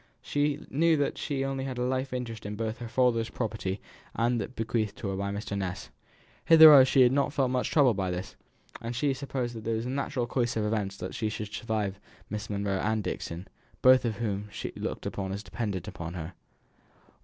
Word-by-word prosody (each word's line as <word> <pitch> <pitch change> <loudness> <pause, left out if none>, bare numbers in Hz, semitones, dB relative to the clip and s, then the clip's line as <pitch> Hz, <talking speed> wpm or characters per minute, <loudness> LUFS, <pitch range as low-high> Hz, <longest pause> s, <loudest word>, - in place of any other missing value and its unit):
She 145 0 0
knew 160 +3 +3
that 145 - -1
she 140 -3 -2
had 135 - 0
only 135 0 -3
a 130 - -4
life 130 +2 -1
interest 120 -3 -4 0.2
both 110 +1 -2
in 120 - -4
her - - -11
father's 120 -2 +2
property 105 -4 -3 0.4
and 115 +1 +2
in 120 - +1
that 120 +4 -5
bequeathed 110 -2 -1
to 100 - -4
her 95 - -2
by 100 +1 -2
Mr. 100 0 -4
Ness. 95 -2 -4 0.5
Hitherto 160 -4 +10
she 130 0 +4
had 125 - +5
not 140 +1 +1
felt 135 -4 +1
much 125 -1 0
troubled 130 -9 +4
by 95 -2 0
this, 90 +1 -5 0.5
as 115 +1 -4
she 145 +4 +1
had 135 - -1
supposed 130 -3 -3
that 110 -1 -7
in 110 -1 +1
the 120 +2 -4
natural 135 -2 -1
course 120 -1 -1
of 105 - 0
events 105 -2 -2
she 110 -2 -2
should 105 -1 -6
survive 105 -4 -2 0.3
Miss 105 0 -4
Monro 100 -1 -1
and 110 +1 0
Dixon, 85 +1 -5 0.4
both 130 0 +7
of 115 -3 -1
whom 105 -2 -3
she - - -5
looked - - -4
upon 95 -1 -3
as 100 +2 -4
dependent 100 -2 -4
upon 85 +1 -6
her. 85 +1 -6
115 Hz, 210 wpm, -29 LUFS, 100-130 Hz, 0.5 s, Hitherto